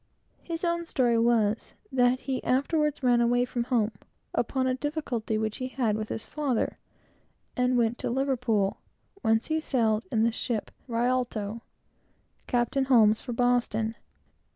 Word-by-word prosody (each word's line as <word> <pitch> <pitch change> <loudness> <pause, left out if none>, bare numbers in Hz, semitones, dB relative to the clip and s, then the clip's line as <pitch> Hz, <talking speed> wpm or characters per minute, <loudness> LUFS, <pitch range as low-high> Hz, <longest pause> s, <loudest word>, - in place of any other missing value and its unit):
His 335 0 -4
own 340 0 -1
story 240 -5 +2
was, 230 -2 +1 0.2
that 250 0 +3
he 265 -2 -3
afterwards 295 +2 +1
ran 245 -1 +4
away 245 +1 +3
from 240 -1 -3
home, 230 -3 +1 0.4
upon 260 +2 0
a 260 - +2
difficulty 255 -6 -2
which 215 -1 -2
he 255 - -3
had 245 -5 0
with 215 0 -4
his 220 - -4
father, 280 -6 -1 0.8
and 250 0 +2
went 235 0 +1
to - - -2
Liverpool, 240 -6 0 0.4
whence 225 +1 +2
he 315 0 0
sailed 230 -7 +1
in 220 -3 +2
the 230 - +3
ship 225 -1 -3 0.2
Rialto, 235 -3 -1 0.9
Captain 245 +2 +1
Holmes, 225 -5 +5
for 245 - -5
Boston. 235 -2 +1
245 Hz, 145 wpm, -28 LUFS, 225-260 Hz, 0.9 s, Holmes